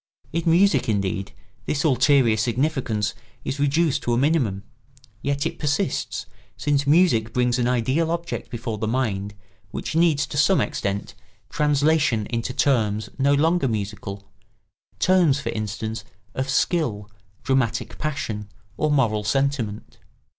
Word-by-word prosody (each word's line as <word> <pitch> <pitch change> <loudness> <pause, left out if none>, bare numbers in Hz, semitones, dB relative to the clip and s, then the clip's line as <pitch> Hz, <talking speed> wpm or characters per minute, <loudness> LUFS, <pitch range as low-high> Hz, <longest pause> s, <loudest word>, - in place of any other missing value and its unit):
In 165 - +1
music, 170 -7 +4
indeed, 100 -2 -1 0.4
this 140 -2 0
ulterior 130 -4 +4
significance 115 -2 0 0.3
is 135 - -3
reduced 145 +1 +2
to 120 - 0
a - - +2
minimum; 125 -9 +1 0.6
yet 140 +1 -1
it - - -3
persists, 150 +2 -1 0.3
since 140 +4 0
music 145 -9 +3
brings 125 0 +1
an 120 - +1
ideal 130 +7 +1
object 170 0 -3
before 115 -3 -4
the 110 - -1
mind 105 -5 -1 0.3
which 155 - -5
needs, 160 -4 +3
to 145 - -6
some 170 +6 +4
extent, 100 -10 -2 0.4
translation 150 -5 +2
into 115 +1 -2
terms 110 -6 +1
no 140 +1 +4
longer 160 0 +2
musical—terms, 105 - -2
for 120 - -4
instance, 110 0 -4 0.3
of 130 +1 -3
skill, 135 - 0 0.4
dramatic 130 -4 0
passion, 110 -9 -3 0.3
or 155 - +1
moral 115 -8 +2
sentiment. 120 -2 -1
130 Hz, 125 wpm, -23 LUFS, 110-150 Hz, 0.6 s, music